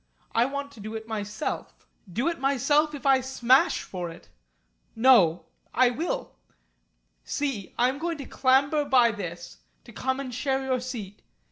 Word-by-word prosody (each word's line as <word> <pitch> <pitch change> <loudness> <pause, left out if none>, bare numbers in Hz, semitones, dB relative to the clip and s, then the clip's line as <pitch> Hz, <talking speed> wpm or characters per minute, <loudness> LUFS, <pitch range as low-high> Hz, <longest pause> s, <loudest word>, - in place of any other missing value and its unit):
I 230 - +4
want 280 +1 -4
to 235 - -15
do 215 +2 -7
it 220 0 -6
myself. 215 +5 -5 0.3
Do 235 - -1
it 340 -1 -1
myself 280 +3 +2
if 285 - -10
I 270 -1 +5
smash 265 +5 +3
for 180 -2 -5
it! 165 +1 -13 0.7
No! 225 -9 +5 0.3
I 250 -1 +5
will. 320 +8 -3 0.9
See 270 -10 -3
I 245 - +4
am 265 +2 -2
going 335 0 -2
to 280 - -7
clamber 275 +4 +2
by 255 -4 +4
this 175 - -7 0.2
to - - -14
come 260 +1 -2
and 260 -3 -5
share 265 +2 -1
your 260 -1 0
seat. 230 -6 -7
260 Hz, 160 wpm, -26 LUFS, 220-280 Hz, 0.9 s, I